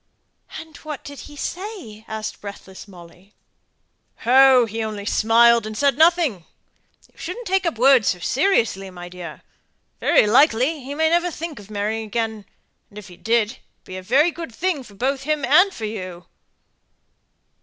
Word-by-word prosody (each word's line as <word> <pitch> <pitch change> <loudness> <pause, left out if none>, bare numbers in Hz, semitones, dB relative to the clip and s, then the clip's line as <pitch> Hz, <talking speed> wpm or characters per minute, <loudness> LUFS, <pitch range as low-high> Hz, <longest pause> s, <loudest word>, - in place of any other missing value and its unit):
"And 320 -1 -12
what 300 -3 -8
did 285 -1 -10
he 295 - -13
say?" 335 - -7
asked 220 0 -6
breathless 200 -1 -10
Molly. 180 +1 -16 0.9
"Oh: 260 0 +6
he 225 +1 -5
only 210 -2 -5
smiled 230 +1 +4
and 215 0 -7
said 280 -1 +2
nothing. 320 - +3 0.7
You - - -23
shouldn't 460 +8 -6
take 380 -2 0
up 325 - -2
words 255 -2 +5
so 180 - +1
seriously, 225 - 0
my 175 -1 -10
dear. 180 -1 -10 0.6
Very - - +4
likely 260 +5 +3
he 280 +3 -6
may 320 +1 +2
never 345 +1 +2
think 330 -3 -7
of 205 0 -14
marrying 215 +2 -3
again, 220 -1 -3 0.4
and 205 - -16
if 210 -2 -10
he 180 - -13
did, 225 +2 +1
it - - -16 0.2
would - - -50
be 185 - -9
a - - -6
very 270 - +3
good 330 -4 -8
thing 320 +4 -2
both 255 +5 -3
for 275 +3 -10
him 300 -2 0
and 355 +10 +5
for 225 -11 -6
you!" 185 -5 -7
235 Hz, 170 wpm, -21 LUFS, 210-305 Hz, 0.9 s, Oh